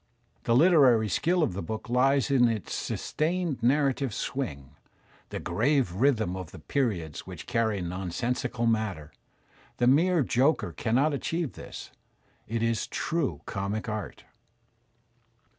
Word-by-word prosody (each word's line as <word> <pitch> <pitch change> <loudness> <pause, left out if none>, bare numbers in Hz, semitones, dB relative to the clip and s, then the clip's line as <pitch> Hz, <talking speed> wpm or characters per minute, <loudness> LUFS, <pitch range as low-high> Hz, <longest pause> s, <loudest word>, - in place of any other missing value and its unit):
The 115 - +3
Uterary 130 - +5
skill 175 - +2
of 145 - 0
the 100 - -4
book 110 +8 -5
lies 135 +3 +2
in 125 -3 +5
its 110 -5 -3
sustained 165 -3 -2
narrative 135 -1 +1
swing, 70 - -4 0.6
the - - -4
grave 130 - +1
rhythm 110 -4 +1
of 90 -3 -6
the - - -11
^/ - - -17
periods 95 - -2
which - - -8
carry 110 -4 0
nonsensical 115 +7 -2
matter. 110 -9 -1 0.7
The 120 - +2
mere 160 +5 +4
joker 130 - +2
cannot 125 - +1
achieve 165 +2 -2
this; - - -9 0.6
it 115 +1 -2
is 115 -2 0
true 165 -4 -2
comic 100 +3 -3
art. 110 -1 -5
120 Hz, 130 wpm, -28 LUFS, 105-140 Hz, 0.7 s, Uterary